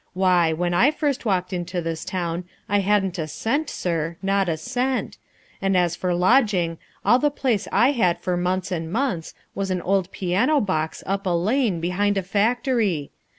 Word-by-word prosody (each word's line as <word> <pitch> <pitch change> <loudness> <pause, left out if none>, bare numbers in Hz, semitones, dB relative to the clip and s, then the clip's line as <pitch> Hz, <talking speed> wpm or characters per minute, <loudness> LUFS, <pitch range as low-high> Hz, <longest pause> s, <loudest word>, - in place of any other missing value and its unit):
Why, 180 -3 +3
when 175 +2 -1
I 245 +10 +5
first 295 -4 -1
walked 185 -3 0
into 175 0 -3
this 165 -1 -3
town 175 -1 -3 0.2
I 205 +1 +2
hadn't 195 -2 +1
a 155 - -2
cent, 280 - -1
sir, 165 -1 -2
not 195 -1 +1
a 160 - 0
cent, 255 +10 -2 0.4
and 195 -1 +2
as 175 -2 +2
for 180 0 -1
lodging, 185 -4 +2 0.3
all 240 +5 +5
the 295 - +3
place 245 -7 -1
I 240 +7 +4
had 185 -11 +2
for 180 -1 -1
months 180 +2 -1
and 165 -2 -3
months 230 -8 -2 0.2
was 195 -1 -3
an 180 -2 -1
old 190 -1 +1
piano 190 - +1
box 160 - -2
up 195 0 -2
a - - +2
lane, 195 +3 +1
behind 200 +4 0
a 195 - 0
factory. 210 - 0
185 Hz, 180 wpm, -23 LUFS, 175-215 Hz, 0.4 s, I